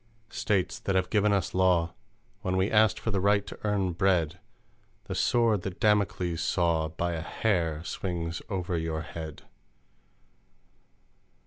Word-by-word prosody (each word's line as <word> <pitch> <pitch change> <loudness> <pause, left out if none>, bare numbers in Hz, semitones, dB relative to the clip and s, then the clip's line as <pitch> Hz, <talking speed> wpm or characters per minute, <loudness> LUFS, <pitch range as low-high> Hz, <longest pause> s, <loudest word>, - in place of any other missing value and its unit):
"States, 100 -4 0
that 100 - -1
have 95 -1 +1
given 105 0 +3
us 100 -5 0
law, 90 -2 +3 0.5
When 95 -2 -1
we 95 +2 +1
asked 110 -1 +4
for 115 - -3
the 100 - +1
right 100 +1 +3
to - - -9
earn 100 -3 +1
bread 85 -2 +1 0.6
The - - -5
Sword 115 -5 +2
that 95 0 -6
Damocles 95 -6 +1
saw 85 -3 +1
By 85 +2 -2
a 80 - -3
hair 85 -5 -1
swings 85 -2 -3
over 90 -3 -2
your 80 -1 -2
head! 80 -3 -8
95 Hz, 140 wpm, -28 LUFS, 85-100 Hz, 0.6 s, asked